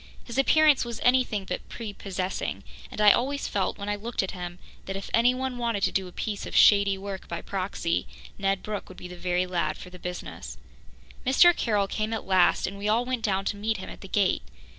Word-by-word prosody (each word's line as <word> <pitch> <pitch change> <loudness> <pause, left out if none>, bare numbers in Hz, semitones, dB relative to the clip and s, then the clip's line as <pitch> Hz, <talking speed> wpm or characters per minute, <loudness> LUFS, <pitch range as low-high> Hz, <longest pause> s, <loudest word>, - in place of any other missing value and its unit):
His 240 +2 -4
appearance 305 +1 +5
was 235 -2 -5
anything 245 -5 +2
but 180 - -5
prepossessing, 195 -4 -4 0.3
and - - -8
I 210 -1 +8
always 280 +6 0
felt, 195 -2 -1
when 200 - -6
I 205 - 0
looked 225 +1 -2
at 190 - -3
him, 175 -1 -6 0.3
that 195 - -3
if 195 - -6
anyone 250 +2 +2
wanted 230 -4 -1
to - - +3
do 190 -1 -1
a - - -10
piece 205 +2 -4
of - - -7
shady 200 -1 +6
work 195 -1 -7
by 170 - -5
proxy, 185 -3 -2 0.3
Ned 195 -1 0
Brooke 210 -1 -5
would 185 - -12
be 180 - -8
the 180 - -9
very 180 0 0
lad 170 -4 -1
for 180 - -11
the 180 - -11
business. 180 0 -7 0.7
Mr. 330 +7 +6
Carroll 210 -4 +1
came 215 +2 -2
at 225 - -3
last, 185 -2 +3
and 200 +1 -5
we 205 - -2
all 230 +3 +2
went 255 -2 -2
down 195 -2 0
to - - -1
meet 215 +1 -1
him 190 - -7
at - - -12
the 195 - -9
gate. 195 -1 +2
200 Hz, 220 wpm, -27 LUFS, 185-230 Hz, 0.7 s, I